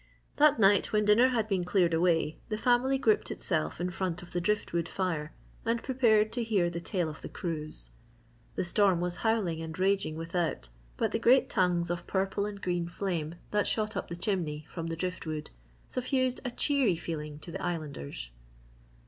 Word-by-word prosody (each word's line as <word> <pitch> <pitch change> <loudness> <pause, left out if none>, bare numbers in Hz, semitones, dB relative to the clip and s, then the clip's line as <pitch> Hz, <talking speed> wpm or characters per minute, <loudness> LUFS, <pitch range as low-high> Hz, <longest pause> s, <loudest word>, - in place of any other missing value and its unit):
That 295 -1 +6
night 200 -1 +4
when 210 -1 +2
dinner 215 +5 +6
had 230 -4 0
been 190 -4 0
cleared 180 -1 +2
away, 165 -2 +2
the 215 - -1
family 250 +4 +3
grouped 225 -5 +2
itself 75 - +2
in 180 +1 -1
front 180 -1 -3
of 175 - -13
the 175 - -1
drift 210 +1 0
wood 170 -1 0
fire 165 -5 -2 0.3
and 230 0 0
prepared 225 -5 +3
to 240 0 -1
hear 195 -6 +1
the 170 0 -4
tale 175 -2 -1
of 155 - -8
the - - -7
cruise. 155 -3 -5 0.6
The - - 0
storm 185 0 +3
was 175 0 -2
howling 205 -8 0
and 160 0 -6
raging 190 -4 +1
without 165 - -2 0.3
but - - 0
the 225 - 0
great 260 +4 +4
tongues 180 -4 +2
of 175 0 -4
purple 195 +1 0
and 205 -1 -7
green 175 -3 -1
flame 170 -3 -3 0.2
that 210 0 +1
shot 215 -1 -1
up - - -3
the 170 - -5
chimney 170 -5 -2
from 165 -2 -4
the 165 - -3
drift 180 0 -4
wood 155 -1 -4 0.4
suffused 255 0 0
a 250 - -2
cheery 260 - +2
feeling 150 -3 -5
to 160 +3 -9
the - - -5
Islanders. 140 - -5
180 Hz, 190 wpm, -30 LUFS, 165-215 Hz, 0.6 s, That